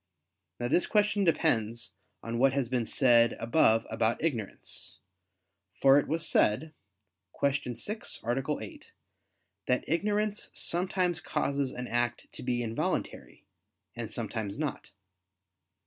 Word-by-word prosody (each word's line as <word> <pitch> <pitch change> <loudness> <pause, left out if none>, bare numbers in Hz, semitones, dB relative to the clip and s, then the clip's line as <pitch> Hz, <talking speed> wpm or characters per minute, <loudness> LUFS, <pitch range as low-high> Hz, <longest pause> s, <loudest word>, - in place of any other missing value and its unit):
Now 120 - -1
this 175 - +2
question 210 -1 +2
depends 120 -9 +1 0.3
on 115 0 -3
what 135 +1 +4
has 135 -4 0
been 125 -3 0
said 120 -3 +4
above 115 -2 +3
about 115 +4 0
ignorance. 115 -11 -3 0.8
For 135 +1 +7
it - - -3
was 165 +1 +1
said 155 +10 +2 0.7
(Q. 140 -3 0
6, 210 - -3
A. 135 +5 0
8) 105 - -11 0.8
that 125 0 +2
ignorance 205 +5 0
sometimes 180 0 0
causes 140 -1 -1
an 125 0 -5
act 120 0 0
to - - -8
be 120 -1 -1
involuntary, 115 0 -3 0.5
and - - -5
sometimes 105 -3 -4
not. 150 -1 -4
135 Hz, 120 wpm, -30 LUFS, 115-165 Hz, 0.8 s, For